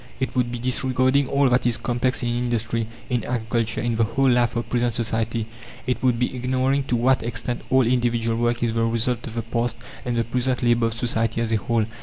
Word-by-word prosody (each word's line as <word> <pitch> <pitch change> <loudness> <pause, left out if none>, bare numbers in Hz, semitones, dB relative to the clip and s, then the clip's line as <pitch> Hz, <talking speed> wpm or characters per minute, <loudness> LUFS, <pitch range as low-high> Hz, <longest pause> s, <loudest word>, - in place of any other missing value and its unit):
It 130 - -2
would 125 -1 +1
be 120 - -3
disregarding 130 +2 +1
all 140 0 +3
that 125 0 +2
is 120 - +1
complex 125 +1 -1
in 120 - 0
industry, 115 -2 -1 0.2
in 120 -3 +1
agriculture, 115 -1 -1
in 120 -2 -1
the 115 - +3
whole 130 +4 +2
life 120 -1 +2
of 120 - -2
present 120 -2 0
society; 115 0 -1 0.4
it 125 - -1
would 125 -2 +2
be 125 +2 -1
ignoring 130 +2 0
to 125 - 0
what 130 +2 +3
extent 120 +1 -3
all 130 -1 +4
individual 120 -2 +1
work 120 0 0
is 115 -1 +1
the 115 0 +1
result 115 +1 0
of 115 - -8
the 115 - -2
past 120 -1 -1 0.3
and 120 -1 -2
the 115 - +2
present 125 +2 0
labour 120 -1 +3
of 115 - -4
society 115 -1 -1
as 115 -1 -1
a 110 - +3
whole. 115 +1 0
120 Hz, 220 wpm, -23 LUFS, 115-125 Hz, 0.4 s, all